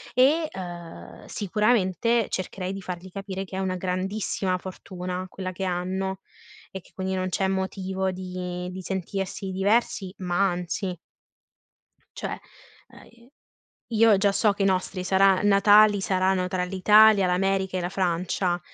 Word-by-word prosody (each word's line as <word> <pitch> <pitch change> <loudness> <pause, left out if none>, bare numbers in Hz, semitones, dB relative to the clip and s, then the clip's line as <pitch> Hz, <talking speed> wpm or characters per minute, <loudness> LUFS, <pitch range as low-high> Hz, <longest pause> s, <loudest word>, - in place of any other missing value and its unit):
e, 295 +6 +4
uhm, 175 -3 -9
sicuramente, 215 +2 +1
cercherei 185 0 -4
di 195 - -6
fargli 180 0 -7
capire 195 0 -5
che 190 - -9
è - - -1
una 190 -1 -1
grandissima 185 +1 -2
fortuna 185 0 -6
quella 185 0 -5
che 190 +1 -6
hanno 190 +1 -2 0.5
e 190 - -7
che - - -23
quindi 190 0 -3
non 185 0 -1
c'è 190 +1 0
motivo 190 0 -2
di 180 -1 -5
di 185 +1 -7
sentirsi 195 +1 -4
diversi, 195 0 +1
ma 185 +1 +1
anzi 180 +1 -3 1.2
Cioè, - - -4 0.6
uhm, - - -16
e 235 +2 -21 0.6
io 220 -2 +5
già 200 +1 +3
so 205 +1 +2
che 200 - -2
i - - +3
nostri 185 -1 0
sarà 190 0 +4
Natali 205 0 +6
saranno 185 -1 +1
tra 185 0 -1
l'Italia, 200 +2 +5
l'America 190 +1 0
e - - -1
la 175 - -2
Francia, 180 0 -1
190 Hz, 145 wpm, -25 LUFS, 185-195 Hz, 1.2 s, Natali